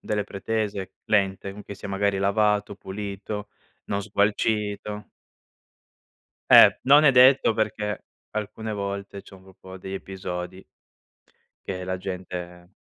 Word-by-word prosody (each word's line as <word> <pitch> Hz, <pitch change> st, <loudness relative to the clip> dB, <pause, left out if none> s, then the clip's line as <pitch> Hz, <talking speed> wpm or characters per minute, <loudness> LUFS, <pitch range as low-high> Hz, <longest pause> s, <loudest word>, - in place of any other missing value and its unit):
delle 105 Hz, -1 st, -2 dB
pretese, 100 Hz, -1 st, -3 dB
lente, 100 Hz, 0 st, 0 dB
che 100 Hz, -, -9 dB
sia 95 Hz, -, -8 dB
magari 100 Hz, 0 st, 0 dB
lavato, 105 Hz, +1 st, +1 dB
pulito, 100 Hz, +1 st, -6 dB, 0.4 s
non 100 Hz, 0 st, -2 dB
sgualcito. 105 Hz, 0 st, -1 dB, 1.5 s
Eh. -, -, +9 dB
Non 145 Hz, +3 st, +7 dB
è 145 Hz, -, +8 dB
detto 130 Hz, -1 st, +6 dB
perché 105 Hz, -1 st, -2 dB, 0.3 s
alcune 110 Hz, +1 st, -4 dB
volte 100 Hz, -1 st, -5 dB
c'è -, -, -15 dB
un 95 Hz, -, -16 dB
gruppo 95 Hz, 0 st, -13 dB
di 95 Hz, +1 st, -8 dB
episodi 95 Hz, -1 st, -6 dB, 1.0 s
che 90 Hz, -1 st, -4 dB
la 95 Hz, 0 st, -2 dB
gente 90 Hz, -1 st, -7 dB
100 Hz, 115 wpm, -25 LUFS, 95-105 Hz, 1.5 s, Eh